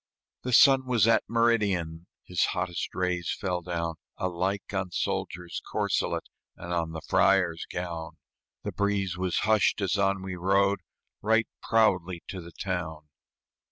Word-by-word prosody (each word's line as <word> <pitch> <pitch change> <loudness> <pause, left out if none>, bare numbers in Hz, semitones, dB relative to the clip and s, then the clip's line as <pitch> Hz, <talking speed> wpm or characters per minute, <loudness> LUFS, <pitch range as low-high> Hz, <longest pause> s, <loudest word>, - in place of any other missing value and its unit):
The 125 - -3
sun 135 +1 +6
was 115 -4 +3
at 115 - +5
meridian, 100 -8 +1 0.2
His 90 -1 -1
hottest 90 -1 -2
rays 90 -2 0
fell 90 -4 -1
down 85 -2 -3 0.2
Alike 95 +3 -2
on 95 -1 -1
soldier's 95 -1 -3
corselet - - 0 0.3
And 85 0 -6
on 85 -2 -1
the 80 - -6
friar's 90 -4 +3
gown; 85 -2 -4 0.5
The - - -3
breeze 100 -3 0
was 90 -1 -1
hushed 110 -1 +3
as 100 -1 0
on 95 -1 +1
we 95 -1 -4
rode 100 +2 +2 0.4
Right 110 +1 +3
proudly 95 -6 +2
to 95 - -5
the 85 0 -11
town. 80 -5 -4
95 Hz, 140 wpm, -28 LUFS, 85-100 Hz, 0.5 s, sun